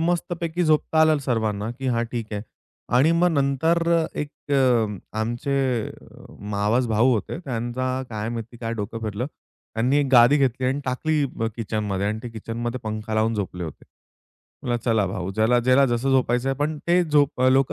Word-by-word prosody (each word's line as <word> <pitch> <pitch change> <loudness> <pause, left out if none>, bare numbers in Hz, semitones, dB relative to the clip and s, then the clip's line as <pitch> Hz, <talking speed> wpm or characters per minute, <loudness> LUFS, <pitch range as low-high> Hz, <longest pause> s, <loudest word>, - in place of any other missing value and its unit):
मस्तपैकी 170 0 -1
झोपता 155 0 +2
आलं 155 -1 +5
सर्वांना 110 -3 -1
की 130 +2 -6
हां 115 -2 +1
ठीक 115 -2 -4
आहे. 105 -1 -3 0.5
आणि 150 +6 +5
मग 180 +1 +4
नंतर 160 +4 +1
अ, - - -1
एक 145 0 -7
अ, 125 -5 +4 0.3
आमचे 120 +5 -2 1.0
मावस 105 +5 +1
भाऊ 115 +4 +3
होते. 110 - -2
त्यांचा 130 -2 -3
काय 110 0 -3
माहिती 115 0 -6
काय 115 -1 -4
डोकं 110 +1 -4
फिरलं. 110 +3 -3 0.5
त्यांनी 125 +5 +2
एक 145 - +2
गादी 120 +4 +7
घेतली 130 -2 +1
आणि 135 +3 0
टाकली 150 +4 0
अ, 115 -4 -3
किचनमध्ये 105 -3 -2
आणि 105 +1 -1
ते 120 - -5
किचनमध्ये 115 +2 -5
पंखा 110 0 -4
लावून 110 +1 +2
झोपले 90 -4 -3
होते. 80 - -9 0.8
म्हणलं 120 -1 -1
चला 110 -4 +2
भाऊ, 95 0 -4
ज्याला 110 +4 +3
ज्याला 130 +3 +4
जसं 120 +2 0
झोपायचंय 130 0 +2
पण 150 +1 -1
ते 180 +1 +5
झोप 145 -4 +2
लोक 135 0 +2
120 Hz, 170 wpm, -23 LUFS, 110-140 Hz, 1.0 s, गादी